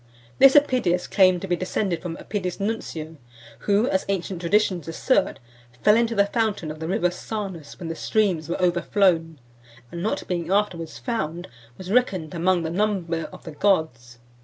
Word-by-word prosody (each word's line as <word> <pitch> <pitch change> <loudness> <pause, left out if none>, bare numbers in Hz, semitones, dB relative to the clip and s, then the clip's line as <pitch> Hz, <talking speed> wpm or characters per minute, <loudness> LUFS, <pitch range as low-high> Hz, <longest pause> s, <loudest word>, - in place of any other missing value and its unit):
This 270 +1 +8
Epidius 250 -11 +3
claimed 185 -3 +4
to - - -3
be 180 - +1
descended 185 -1 -2
from 170 -2 -5
Epidius 185 -3 -4
Nuncio, 165 -7 -4 0.5
who, 205 +3 +4
as 190 -5 +1
(528) 195 - +1
ancient 180 -1 -6
traditions 180 -2 +1
assert, 165 +10 +1 0.5
fell 210 - +6
into 230 0 +1
the 200 -1 +4
fountain 205 -7 -1
of 155 - -9
the 160 - -4
river 180 -1 +1
Sarnus 190 -4 -6
when 175 - -6
the 165 - -3
streams 180 -3 0
were 170 - -2
overflown, 175 -3 +1 0.5
and 170 - -6
not 215 - -2
being 170 -2 -2
afterwards 185 -6 0
found, 175 - -3 0.3
was 185 0 -7
reckoned 195 -10 +1
among 175 0 +1
the 160 - -3
number 175 -4 -1
of - - -12
the 160 - -8
gods. 150 - 0
180 Hz, 170 wpm, -24 LUFS, 165-205 Hz, 0.5 s, This